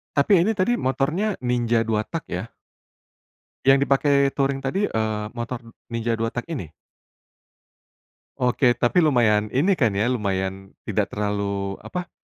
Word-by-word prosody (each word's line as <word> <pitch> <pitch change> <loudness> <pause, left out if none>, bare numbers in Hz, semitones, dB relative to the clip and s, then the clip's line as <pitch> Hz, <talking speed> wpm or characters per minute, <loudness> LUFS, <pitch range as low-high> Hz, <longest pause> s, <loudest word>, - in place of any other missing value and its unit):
Tapi 140 +7 +3
ini 220 - +1
tadi 230 +5 +1
motornya 150 - 0
Ninja 120 -2 +1
2 110 -1 -1
tak 165 -2 -5
ya? 90 +5 -3 1.2
Yang 135 +1 +4
dipakai 140 0 +3
touring 135 -1 0
tadi, 135 +10 -1
eee, 110 - -1
motor 120 0 -5 0.3
Ninja 115 0 -2
2 115 0 -1
tak 120 +1 -4
ini? 125 - -4 1.7
Oke 125 0 +3
tapi 120 +9 +1
lumayan 120 -10 +3
ini 180 +8 +3
kan 115 -7 +2
ya 105 +5 +1
lumayan 95 -4 -2
tidak - - 0
terlalu 100 -1 -2
apa 180 0 -5
120 Hz, 135 wpm, -23 LUFS, 105-140 Hz, 1.7 s, Yang